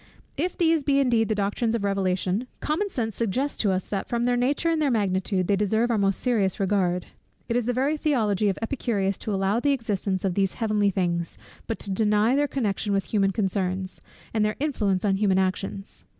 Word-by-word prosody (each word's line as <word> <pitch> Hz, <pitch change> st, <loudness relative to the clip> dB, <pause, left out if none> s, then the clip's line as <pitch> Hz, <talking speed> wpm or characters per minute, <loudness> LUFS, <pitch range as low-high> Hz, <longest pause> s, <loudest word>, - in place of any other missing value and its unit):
If 350 Hz, +5 st, -2 dB
these 325 Hz, -3 st, +3 dB
be 275 Hz, 0 st, +3 dB
indeed 235 Hz, -5 st, +2 dB
the 215 Hz, -, +1 dB
doctrines 205 Hz, +3 st, 0 dB
of 225 Hz, -, -2 dB
Revelation, 195 Hz, +2 st, 0 dB
common 365 Hz, +7 st, -1 dB
sense 225 Hz, -, -3 dB
suggests 250 Hz, +6 st, -1 dB
to 205 Hz, -, +2 dB
us 185 Hz, 0 st, -1 dB
that 195 Hz, -2 st, -3 dB
from 235 Hz, 0 st, 0 dB
their 245 Hz, 0 st, +2 dB
nature 265 Hz, +7 st, +1 dB
and 320 Hz, -1 st, 0 dB
their 290 Hz, -, +2 dB
magnitude, 190 Hz, -4 st, 0 dB
they 200 Hz, -, +3 dB
deserve 220 Hz, +4 st, +1 dB
our 230 Hz, -, +2 dB
most 195 Hz, -1 st, +1 dB
serious 215 Hz, -7 st, +1 dB
regard. 185 Hz, -3 st, +1 dB, 0.4 s
It 230 Hz, -, -1 dB
is 245 Hz, -1 st, 0 dB
the -, -, +2 dB
very 275 Hz, +5 st, +1 dB
theology 215 Hz, -, +1 dB
of 195 Hz, -, -2 dB
Epicurus 205 Hz, -6 st, -1 dB
to 215 Hz, -, -4 dB
allow 195 Hz, +3 st, +1 dB
the 285 Hz, +3 st, +2 dB
existence 200 Hz, -6 st, -2 dB
of 190 Hz, -, +1 dB
these 195 Hz, 0 st, 0 dB
"heavenly 210 Hz, -3 st, +1 dB
things," 175 Hz, -3 st, -1 dB, 0.3 s
but 225 Hz, -, -2 dB
to 200 Hz, -, -2 dB
deny 210 Hz, +4 st, +3 dB
their 290 Hz, +1 st, +2 dB
connection 210 Hz, -6 st, -1 dB
with 195 Hz, +2 st, -2 dB
human 195 Hz, -2 st, +3 dB
concerns, 190 Hz, -2 st, -1 dB, 0.3 s
and 220 Hz, -1 st, +2 dB
their 210 Hz, 0 st, 0 dB
influence 210 Hz, -10 st, 0 dB
on 195 Hz, -1 st, +2 dB
human 195 Hz, -2 st, +2 dB
actions. 190 Hz, +1 st, -2 dB
210 Hz, 205 wpm, -25 LUFS, 195-245 Hz, 0.4 s, these